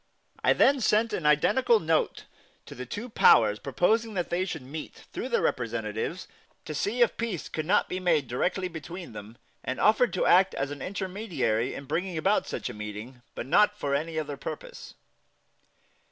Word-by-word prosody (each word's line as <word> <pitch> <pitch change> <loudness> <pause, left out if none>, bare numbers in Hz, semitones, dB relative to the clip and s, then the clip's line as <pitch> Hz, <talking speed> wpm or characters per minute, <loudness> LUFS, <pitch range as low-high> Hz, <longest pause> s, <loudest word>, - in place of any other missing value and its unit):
I - - +5
then 275 -1 +4
sent 220 +1 +2
an 150 - -1
identical 215 - +4
note 160 -2 0 0.4
to - - -10
the 125 0 -7
two 205 - -5
powers 105 - +5
proposing 215 - +1
that 175 -2 -2
they 180 +2 +1
should 160 -7 -5
meet, 150 +5 -7 0.2
through 255 - -4
their 235 - +1
representatives, 115 - -2 0.4
to 155 - -5
see 220 +11 +2
if 235 - 0
peace 225 -8 -3
could 155 -1 -4
not 205 +3 +3
be 185 - -3
made 165 -7 +2
directly 180 +10 -1
between 170 -1 -8
them, 105 +2 -10 0.3
and 130 - -3
offered 220 +3 +4
to 185 - 0
act 190 +2 +5
as 135 +1 -2
an 145 -2 -7
intermediary 185 - -2
in 140 - -7
bringing 180 +4 -2
about 195 +6 +1
such - - -4
a - - -5
meeting, 105 +4 -8
but - - -4
not 210 +8 +3
for 140 -7 -2
any 160 +3 -1
other 145 -2 -3
purpose. 150 +3 -8
165 Hz, 180 wpm, -27 LUFS, 135-205 Hz, 0.4 s, I